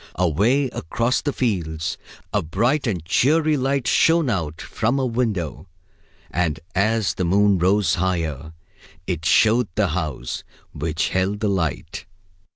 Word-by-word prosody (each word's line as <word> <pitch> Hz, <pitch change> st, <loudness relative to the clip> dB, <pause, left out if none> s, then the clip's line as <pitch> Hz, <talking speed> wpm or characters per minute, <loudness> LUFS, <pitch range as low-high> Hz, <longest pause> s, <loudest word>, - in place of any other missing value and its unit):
Away 100 Hz, -, +2 dB
across 115 Hz, -, -1 dB
the 145 Hz, -, -1 dB
fields 85 Hz, -, -2 dB, 0.4 s
a -, -, +2 dB
bright 120 Hz, -, 0 dB
and 90 Hz, -8 st, -2 dB
cheery 155 Hz, -, +3 dB
light 135 Hz, -1 st, 0 dB
shone 165 Hz, -3 st, +3 dB
out 80 Hz, -5 st, -3 dB
from 115 Hz, +5 st, -1 dB
a 135 Hz, -, +1 dB
window, 105 Hz, -, -2 dB, 0.6 s
and 80 Hz, -4 st, 0 dB
as 105 Hz, 0 st, +1 dB
the 95 Hz, -, -2 dB
moon 100 Hz, +2 st, +3 dB
rose 95 Hz, +3 st, +2 dB
higher, 80 Hz, -4 st, -2 dB, 0.5 s
it 85 Hz, -4 st, -3 dB
showed 115 Hz, +7 st, +4 dB
the 105 Hz, -3 st, +2 dB
house 80 Hz, -5 st, -3 dB, 0.3 s
which 80 Hz, +2 st, -2 dB
held 95 Hz, +2 st, 0 dB
the 105 Hz, -1 st, 0 dB
light. 90 Hz, 0 st, -3 dB
95 Hz, 135 wpm, -22 LUFS, 80-120 Hz, 0.6 s, showed